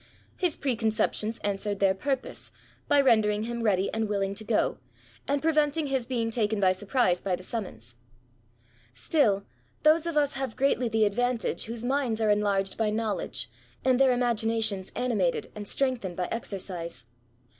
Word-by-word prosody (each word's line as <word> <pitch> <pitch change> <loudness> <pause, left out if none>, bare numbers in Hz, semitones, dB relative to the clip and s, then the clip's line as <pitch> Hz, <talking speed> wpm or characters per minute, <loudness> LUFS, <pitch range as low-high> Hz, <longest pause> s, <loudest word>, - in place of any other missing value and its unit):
His 355 -4 0
preconceptions 225 -3 0
answered 205 0 -1
their 195 -1 +4
purpose, 265 +6 -3 0.4
by 290 - +4
ren 235 -5 +5
dering 210 0 0
him 235 +1 -4
ready 200 -4 +1
and 220 -1 -1
willing 195 -1 0
to 210 +2 -4
go, 215 0 0 0.5
and 285 +1 0
prevent 305 -1 +2
ing 315 - 0
his 265 -4 -1
being 230 -3 -1
taken 220 -2 0
by 190 -2 +4
surprise 190 -1 +1
by 190 -2 0
the 185 - -11
sumqions. - - -9
118 190 - -10 1.1
ESSAYS. 125 - -8
Stilly 225 -11 +3 0.4
those 310 +2 +4
of 330 -2 -2
us 290 -2 +2
haye 270 -4 -3
greatly 255 -3 +1
the 220 -1 +3
adyantage 245 +3 -1
whose 230 +1 -6
minds 260 -4 0
are 215 -1 +3
enlarged 200 -1 0
by 220 -1 +2
knowledge^ 215 -2 -2 0.4
and 260 -1 +4
their 270 -1 +5
imaginations 225 -5 +1
animated 210 -9 0
and 205 -1 -7
strengthened 245 -10 0
by 180 - 0
exercise. 180 - -4
225 Hz, 165 wpm, -27 LUFS, 200-255 Hz, 1.1 s, ren